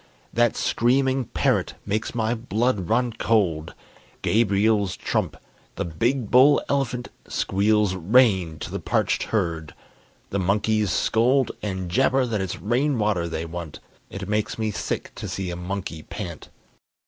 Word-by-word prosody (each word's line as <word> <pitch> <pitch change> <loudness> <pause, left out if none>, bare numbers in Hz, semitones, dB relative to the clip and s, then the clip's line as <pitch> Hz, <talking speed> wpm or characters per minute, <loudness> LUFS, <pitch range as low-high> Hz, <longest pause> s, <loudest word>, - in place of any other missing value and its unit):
That 120 -1 +2
screaming 130 +2 +2
parrot - - 0
makes 105 +4 -2
my 115 0 +1
blood 115 -4 -1
run 120 +1 +1
cold. 90 -10 0 0.5
Gabriel's 105 -2 +2
trump! - - -1 0.4
the - - -2
big 115 - -1
bull 135 +4 +7
elephant 125 -3 -1 0.2
Squeals 105 0 +1
"Rain!" 95 -3 +3
to - - -5
the - - -3
parched - - 0
herd. 85 -7 -2 0.6
The 100 - 0
monkeys 105 +2 +1
scold, 125 +7 +2
And 95 -3 -3
jabber 130 +3 +3
that 110 -4 -1
it's 95 -2 -4
rain 125 +6 +1
water 105 -6 +1
they 80 0 -3
want. 85 -2 -7 0.3
(It 100 -1 -6
makes 105 0 -1
me 110 -1 -1
sick - - -4
to - - -6
see 95 -2 -3
a - - -4
monkey 90 -2 -5
pant.) 85 -2 -7
105 Hz, 140 wpm, -24 LUFS, 95-120 Hz, 0.6 s, bull